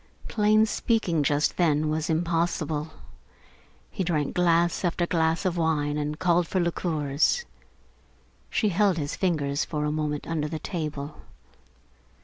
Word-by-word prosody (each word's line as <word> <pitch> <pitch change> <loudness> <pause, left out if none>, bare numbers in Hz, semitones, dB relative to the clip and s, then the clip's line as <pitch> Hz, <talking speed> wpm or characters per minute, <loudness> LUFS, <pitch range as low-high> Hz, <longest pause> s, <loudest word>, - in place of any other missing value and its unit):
Plain 215 0 +3
speaking 215 -7 0
just 145 +1 +1
then 155 -3 +2
was 155 +1 -1
impossible. 160 -2 -1 1.0
He 190 - -2
drank 155 -5 -1
glass 170 0 +2
after 175 0 +1
glass 165 +1 0
of 180 -2 0
wine 150 -3 +1
and 150 +1 -3
called 175 -1 +2
for 190 - 0
liqueurs. 165 - 0 1.0
She 215 - +1
held 195 -1 +2
his 145 -2 -3
fingers 145 -6 0
for 150 -2 -3
a 150 - 0
moment 150 -1 -2
under 155 -2 -2
the 160 - -4
table. 150 -3 -5
160 Hz, 130 wpm, -26 LUFS, 150-175 Hz, 1.0 s, Plain